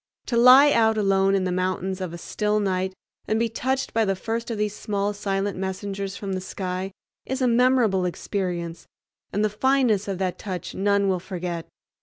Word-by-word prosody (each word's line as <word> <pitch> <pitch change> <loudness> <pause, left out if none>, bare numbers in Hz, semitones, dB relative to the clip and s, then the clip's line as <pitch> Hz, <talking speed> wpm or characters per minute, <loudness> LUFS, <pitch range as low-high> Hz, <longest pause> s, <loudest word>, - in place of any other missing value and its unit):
To 240 - -2
lie 255 +5 +8
out 220 -3 +3
alone 195 -1 +3
in 195 - +1
the 185 - -1
mountains 185 +1 -1
of 185 -3 -3
a 170 - -7
still 210 +4 -1
night 190 -2 -1 0.3
and 220 - +1
be 230 0 +1
touched 260 +4 -2
by 225 - +3
the 195 -2 +1
first 230 +5 -3
of 230 - -3
these 210 0 -1
small 205 -1 -2
silent 200 -1 -2
messengers 195 +1 -4
from 195 -2 -4
the 185 - -2
sky 185 0 -4 0.4
is 265 +1 -2
a 255 - +2
memorable 235 -6 +3
experience, 175 -2 -3 0.4
and 205 +3 +1
the - - +4
fineness 225 -2 +2
of 195 -2 -2
that 185 -1 -2
touch 185 -4 -5
none 200 0 +2
will 185 -2 +1
forget. 175 -2 -5
200 Hz, 190 wpm, -24 LUFS, 185-220 Hz, 0.4 s, lie